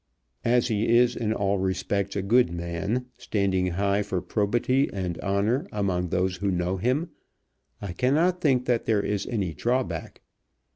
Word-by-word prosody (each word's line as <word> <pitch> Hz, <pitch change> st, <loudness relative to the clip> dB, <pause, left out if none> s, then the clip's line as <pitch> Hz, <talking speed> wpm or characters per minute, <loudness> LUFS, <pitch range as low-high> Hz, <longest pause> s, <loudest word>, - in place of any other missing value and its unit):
As 120 Hz, +1 st, +2 dB
he 110 Hz, 0 st, 0 dB
is 120 Hz, 0 st, +4 dB
in 110 Hz, -2 st, -1 dB
all 100 Hz, -2 st, 0 dB
respects 95 Hz, +1 st, -1 dB
a 100 Hz, -, -1 dB
good 115 Hz, -1 st, +3 dB
man, 85 Hz, +8 st, -2 dB
standing 100 Hz, -6 st, 0 dB
high 100 Hz, +3 st, +1 dB
for 100 Hz, -3 st, -2 dB
probity 120 Hz, +8 st, +1 dB
and 90 Hz, -3 st, -3 dB
honour 105 Hz, -, 0 dB
among 90 Hz, -4 st, -1 dB
those 95 Hz, +1 st, 0 dB
who 100 Hz, +2 st, -1 dB
know 90 Hz, 0 st, 0 dB
him, 130 Hz, -, 0 dB, 0.7 s
I 95 Hz, -4 st, -4 dB
cannot 160 Hz, -, +2 dB
think 130 Hz, -6 st, +2 dB
that 120 Hz, -2 st, +1 dB
there 105 Hz, -3 st, +2 dB
is 105 Hz, -1 st, -2 dB
any 100 Hz, -8 st, -2 dB
drawback. 125 Hz, +6 st, -2 dB
100 Hz, 155 wpm, -26 LUFS, 95-125 Hz, 0.7 s, is